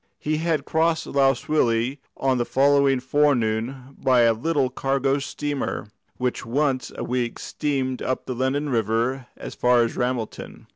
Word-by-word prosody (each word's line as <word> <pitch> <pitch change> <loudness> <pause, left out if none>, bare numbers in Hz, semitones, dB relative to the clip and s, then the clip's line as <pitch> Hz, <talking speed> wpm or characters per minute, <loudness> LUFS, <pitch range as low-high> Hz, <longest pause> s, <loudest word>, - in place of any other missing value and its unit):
He 155 +1 -1
had 160 -3 0
crossed 160 0 +1
Lough 135 -1 +3
Swilly 125 -2 0 0.2
on 130 -2 +1
the - - +2
following 140 +1 +3
fore 145 +3 +3
noon 120 +4 -3
by 130 -2 +4
a 115 -1 +5
little 140 +2 0
cargo 135 +1 0
steamer, 145 -5 -3 0.3
which 125 -1 -2
once 130 +2 0
a - - -4
week 120 -1 -2
steamed 135 -4 -2
up 130 - -2
the 130 - -3
Lennon 135 +4 -1
River 120 +2 0
as - - -7
far 125 -1 +3
as 115 - -3
Ramelton. 125 -3 -3
130 Hz, 155 wpm, -24 LUFS, 125-140 Hz, 0.3 s, a